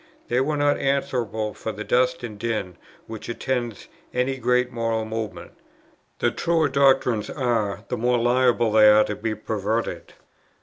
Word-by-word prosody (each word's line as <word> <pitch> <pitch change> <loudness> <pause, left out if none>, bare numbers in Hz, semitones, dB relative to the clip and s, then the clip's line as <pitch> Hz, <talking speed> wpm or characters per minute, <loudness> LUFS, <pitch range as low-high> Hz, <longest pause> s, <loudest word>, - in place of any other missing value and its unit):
"They 125 +2 +2
were 150 +2 0
not 145 0 +2
answerable 120 -6 -1
for 110 - -5
the 105 0 -6
dust 125 +2 +1
and 105 -4 -7
din 110 -6 -3 0.3
which 110 0 -8
attends 120 -2 -3 0.3
any 130 +2 0
great 125 0 +1
moral 115 -2 -1
movement. 110 -1 -5 0.7
The - - +1
truer 165 -3 +1
doctrines 135 -5 +2
are, 115 -6 -1
the - - -3
more 125 +2 +2
liable 120 -1 +2
they 105 0 +7
are 105 0 +6
to 105 - -4
be 110 +1 -3
perverted." 110 +1 -3
120 Hz, 155 wpm, -24 LUFS, 110-125 Hz, 0.7 s, they